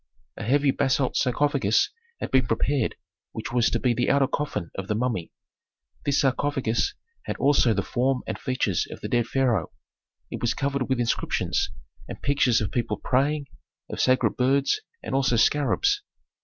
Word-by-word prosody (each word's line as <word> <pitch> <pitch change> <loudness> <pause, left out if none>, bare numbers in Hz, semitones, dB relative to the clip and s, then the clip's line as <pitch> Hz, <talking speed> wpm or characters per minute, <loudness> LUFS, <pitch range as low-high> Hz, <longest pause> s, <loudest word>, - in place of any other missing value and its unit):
A - - -8
heavy 140 +4 +3
basalt 135 -1 +1
sarcophagus 130 -4 +2 0.3
had - - -4
been 130 -3 +3
prepared 130 +2 0 0.4
which - - -5
was 120 -2 +3
to 120 - 0
be 120 0 +1
the 125 +1 0
outer 140 0 +4
coffin 105 - -3
of 95 0 -5
the 105 - 0
mummy. 115 -7 -2 0.7
This 140 -1 +2
sarcophagus 130 -4 0 0.3
had - - -3
also 135 -5 +3
the 100 - 0
form 130 +1 0
and - - -4
features 125 -8 0
of - - -9
the - - -4
dead 120 -1 +1
pharaoh. 120 -9 +1 0.6
It - - -5
was 120 - 0
covered 140 -2 -1
with 130 -2 +1
inscriptions, 120 -1 0 0.4
and - - -7
pictures 135 -5 +2
of 100 - -2
people 120 -1 -1
praying, 140 +3 0 0.5
of - - -5
sacred 130 0 +2
birds 135 - +2 0.2
and - - -5
also 135 -2 +2
scarabs. 150 - +2
130 Hz, 165 wpm, -25 LUFS, 115-140 Hz, 0.7 s, outer